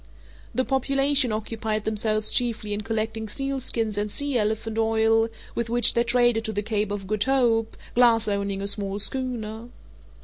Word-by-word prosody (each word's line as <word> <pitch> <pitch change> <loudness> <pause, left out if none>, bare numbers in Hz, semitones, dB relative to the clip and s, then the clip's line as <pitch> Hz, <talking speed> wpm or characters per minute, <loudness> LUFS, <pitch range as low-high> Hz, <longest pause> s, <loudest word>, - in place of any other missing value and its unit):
The 255 +2 +1
population 275 0 +2
occupied 215 0 -3
themselves 215 0 +2
chiefly 225 -4 +1
in 205 - -3
collecting 220 0 -3
sealskins 245 -5 -2
and 210 0 -2
sea 285 +5 -2
elephant 220 0 -1
oil, 225 0 +3 0.3
with 235 -1 -3
which 240 +1 +3
they 235 - +2
traded 240 -1 +2
to 220 - -1
the 205 0 -2
Cape 210 -1 -1
of 205 -1 -4
Good 210 +1 -1
Hope, 240 -4 +1 0.2
Glass 235 -2 +4
owning 200 -1 -2
a - - -2
small 200 -1 -2
schooner. 230 -1 -4
225 Hz, 160 wpm, -25 LUFS, 215-240 Hz, 0.3 s, Glass